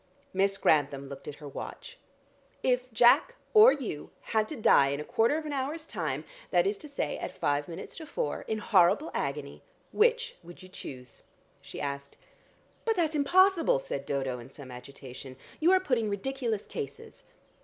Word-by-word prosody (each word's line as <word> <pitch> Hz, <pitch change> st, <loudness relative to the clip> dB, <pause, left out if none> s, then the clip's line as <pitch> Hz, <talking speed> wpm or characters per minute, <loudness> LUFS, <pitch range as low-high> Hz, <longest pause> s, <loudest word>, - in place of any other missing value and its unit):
Miss 195 Hz, +1 st, +2 dB
Grantham 140 Hz, -4 st, +2 dB
looked 140 Hz, -, -9 dB
at 145 Hz, -, -5 dB
her 150 Hz, -1 st, -10 dB
watch. -, -, -8 dB, 0.6 s
"If 250 Hz, 0 st, +1 dB
Jack 240 Hz, -, +5 dB, 0.2 s
or 440 Hz, +3 st, +9 dB
you 225 Hz, -, -4 dB
had 220 Hz, -1 st, 0 dB
to 310 Hz, -, -5 dB
die 215 Hz, -, +5 dB
in 140 Hz, +1 st, -2 dB
a -, -, -3 dB
quarter 230 Hz, -, +2 dB
of 320 Hz, -, -5 dB
an 300 Hz, -, -4 dB
hour's 290 Hz, +4 st, -3 dB
time, 155 Hz, -, -3 dB, 0.3 s
that 175 Hz, 0 st, +3 dB
is 200 Hz, +2 st, +1 dB
to 300 Hz, -, -8 dB
say 280 Hz, -, -3 dB
at -, -, -6 dB
five 145 Hz, 0 st, 0 dB
minutes 170 Hz, +2 st, -8 dB
to 320 Hz, -2 st, -8 dB
four 150 Hz, -, -2 dB
in 220 Hz, -, -1 dB
horrible 205 Hz, -, +3 dB
agony, 140 Hz, 0 st, -3 dB, 0.3 s
which 470 Hz, +2 st, +2 dB
would 175 Hz, +2 st, -13 dB
you 185 Hz, -, -12 dB
choose?" 130 Hz, -8 st, -10 dB, 0.4 s
she -, -, -9 dB
asked. 140 Hz, 0 st, -5 dB, 0.7 s
"But 450 Hz, -1 st, +1 dB
that's 325 Hz, -3 st, +1 dB
impossible," 370 Hz, -, +4 dB
said -, -, -5 dB
Dodo 135 Hz, -3 st, -2 dB
in 120 Hz, -, -11 dB
some 135 Hz, -1 st, -11 dB
agitation. 130 Hz, +1 st, -10 dB, 0.2 s
"You 335 Hz, +3 st, +4 dB
are 375 Hz, -, +6 dB
putting 250 Hz, -, 0 dB
ridiculous 230 Hz, +1 st, -2 dB
cases." 140 Hz, 0 st, -7 dB
200 Hz, 175 wpm, -29 LUFS, -, 0.7 s, or